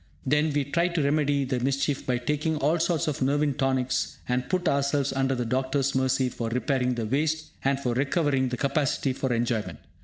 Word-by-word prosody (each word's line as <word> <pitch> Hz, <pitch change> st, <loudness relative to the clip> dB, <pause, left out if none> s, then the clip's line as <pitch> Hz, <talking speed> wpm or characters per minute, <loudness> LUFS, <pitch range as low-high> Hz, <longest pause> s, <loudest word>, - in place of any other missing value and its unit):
Then, 150 Hz, +3 st, +2 dB
we 145 Hz, 0 st, +1 dB
try 170 Hz, +5 st, +1 dB
to 170 Hz, -4 st, -1 dB
remedy 145 Hz, -1 st, +1 dB
the 130 Hz, -1 st, -1 dB
mischief 135 Hz, +2 st, -1 dB
by 125 Hz, -1 st, +1 dB
taking 150 Hz, +5 st, -1 dB
all 150 Hz, +4 st, +1 dB
sorts 165 Hz, -2 st, 0 dB
of 150 Hz, -3 st, -2 dB
'nervine 145 Hz, +2 st, +2 dB
tonics' 130 Hz, -1 st, 0 dB
and 125 Hz, 0 st, -1 dB
put 185 Hz, -2 st, 0 dB
ourselves 140 Hz, 0 st, +1 dB
under 135 Hz, 0 st, +1 dB
the 125 Hz, -1 st, -2 dB
doctor's 130 Hz, +3 st, 0 dB
mercy 130 Hz, 0 st, +1 dB
for 115 Hz, -2 st, -4 dB
repairing 125 Hz, +1 st, 0 dB
the 115 Hz, -2 st, -2 dB
waste, 155 Hz, +6 st, -1 dB
and 135 Hz, 0 st, +1 dB
for 125 Hz, -3 st, -1 dB
recovering 135 Hz, 0 st, +1 dB
the 125 Hz, -, -3 dB
capacity 140 Hz, -1 st, 0 dB
for 130 Hz, 0 st, -2 dB
enjoyment. 115 Hz, -2 st, -1 dB
135 Hz, 190 wpm, -26 LUFS, 130-145 Hz, -, Then